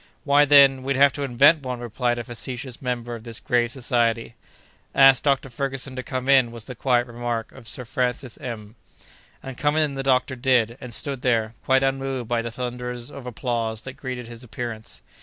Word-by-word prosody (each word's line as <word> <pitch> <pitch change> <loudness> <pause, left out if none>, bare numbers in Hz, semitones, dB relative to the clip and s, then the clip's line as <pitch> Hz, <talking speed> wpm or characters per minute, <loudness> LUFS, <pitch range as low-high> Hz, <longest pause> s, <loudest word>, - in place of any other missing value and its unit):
"Why, 145 0 +5
then, 140 -2 +6
we'd 135 +1 -1
have 140 0 +5
to 145 - -5
invent 140 +4 +4
one!" 125 -2 -4
replied 120 +1 -1
a 120 - -3
facetious 120 +2 -6
member 120 -2 -3
of 115 -2 -8
this 115 -2 -6
grave 120 -1 +1
Society. 120 -2 0 0.6
"Ask 135 -2 +7
Dr. 140 -2 +1
Ferguson 135 +1 -3
to 130 - -3
come 130 0 -4
in," 130 -4 +5
was 115 -1 -8
the 125 - -7
quiet 120 0 +1
remark 120 -2 -4
of 130 -4 -13
Sir 115 +4 -2
Francis 125 +1 -2
M——. 110 -4 -7 0.7
And 135 -2 -8
come 145 0 +1
in 155 -2 +2
the 135 - -3
doctor 130 0 +1
did, 120 -3 +2
and 125 - -8
stood 135 +2 -2
there, 115 -3 +1
quite 130 0 +3
unmoved 135 -2 -1
by 120 0 0
the 115 - -4
thunders 125 +1 -5
of 135 -3 -9
applause 115 -2 -2
that 130 - -7
greeted 130 -3 -6
his 120 +1 -10
appearance. 115 -2 -6
125 Hz, 195 wpm, -24 LUFS, 120-135 Hz, 0.7 s, Ask